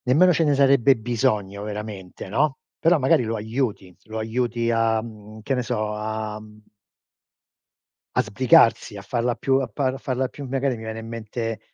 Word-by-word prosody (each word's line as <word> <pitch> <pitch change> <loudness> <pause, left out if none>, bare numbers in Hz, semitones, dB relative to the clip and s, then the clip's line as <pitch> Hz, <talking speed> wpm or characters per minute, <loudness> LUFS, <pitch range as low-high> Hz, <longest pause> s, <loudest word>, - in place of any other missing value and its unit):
Nemmeno 175 +8 +5
ce 165 - +2
ne 145 -1 +3
sarebbe 135 -1 +5
bisogno 110 -4 -1
veramente, 105 -4 -7
no. 135 +7 +1 0.2
Però 170 +1 +4
magari 130 -3 +3
lo 115 0 -2
aiuti, 110 -4 -3
lo 110 0 -6
aiuti 115 +1 -1
a, 115 -1 +2
mhmm, 110 -1 -11
che 135 - -1
ne 125 - 0
so, 110 -3 -2
a 110 0 -4
mhmm 105 0 -15 1.5
a - - +4
sbrigarsi, 115 -2 +3
a - - -7
farla 120 +4 -1
più, 135 0 +1
a 130 - -2
pa 130 +5 -1
a - - -6
farla 130 0 -2
più 140 +2 -9
magari 135 0 -1
mi 110 - -9
viene 110 0 -5
in 115 - -8
mente 115 0 -4
115 Hz, 180 wpm, -23 LUFS, 110-130 Hz, 1.5 s, Nemmeno